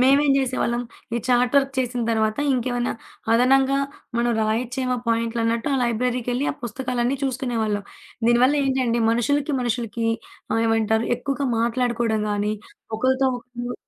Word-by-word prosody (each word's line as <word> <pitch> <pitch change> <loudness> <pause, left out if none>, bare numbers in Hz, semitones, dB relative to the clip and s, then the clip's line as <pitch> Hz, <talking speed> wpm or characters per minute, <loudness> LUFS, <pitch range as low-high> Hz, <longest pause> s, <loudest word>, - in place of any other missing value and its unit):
మేమేం 275 +3 +5
జేసేవాళ్ళం 250 -2 0 0.3
ఈ - - +1
chat 245 +1 +3
work 275 -1 +3
చేసిన 250 -1 -1
తర్వాత 220 0 +1
ఇంకేమన్నా 245 -1 0 0.4
అదనంగా 265 +3 +4 0.4
మనం 240 0 +2
రాయొచ్చేమో 250 +3 -1
పాయింట్లన్నట్టు 230 +1 0
ఆ - - +2
లైబ్రరీకెళ్ళి 245 +2 0
ఆ - - -13
పుస్తకాలన్నీ 250 +2 -1
చూసుకునేవాళ్ళం. 235 -6 -1 0.4
దీనివల్ల 245 +4 +5
ఏంటంటే 255 -3 +1
మనుషులకి, 280 +6 +1
మనుషులకి 230 -2 -2 0.5
ఆహ్, 225 - +2
ఏమంటారు 220 0 +2
ఎక్కువగా 275 +3 -2
మాట్లాడుకోవడం 235 -2 0
గాని 205 +1 0 0.4
ఒకళ్ళతో 260 +3 +2
ఒకళ్ళు 245 0 -6
245 Hz, 120 wpm, -23 LUFS, 230-260 Hz, 0.5 s, మేమేం